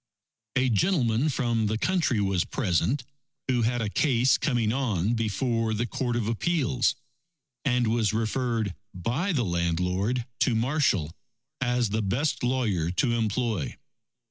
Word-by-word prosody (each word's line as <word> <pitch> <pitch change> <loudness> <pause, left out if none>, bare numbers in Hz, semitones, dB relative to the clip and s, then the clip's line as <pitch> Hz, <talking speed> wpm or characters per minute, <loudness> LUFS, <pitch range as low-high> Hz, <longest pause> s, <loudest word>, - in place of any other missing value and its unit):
A 130 0 +3
gentleman 125 - +2
from 120 -5 0
the 110 +1 0
country 165 - +1
was 95 -3 +1
present, 120 - 0 0.4
who 125 -2 +2
had 120 +1 +1
a 105 - -1
case 130 -2 +3
coming 120 -5 +1
on 115 -6 0
before 115 0 0
the 115 +3 0
Court 120 +1 -2
of 115 -3 -1
Appeals, 125 +1 +1 0.7
and 125 -2 +2
was 110 -2 +1
referred 115 -2 -1 0.2
by 125 - -1
the 130 -9 +1
landlord 90 +7 0
to 120 - +2
Marshall 110 - +1 0.5
as 125 -2 +1
the 110 +1 0
best 125 +10 0
lawyer 115 -10 0
to 120 +8 +1
employ. 110 - -1
115 Hz, 135 wpm, -27 LUFS, 105-130 Hz, 0.7 s, A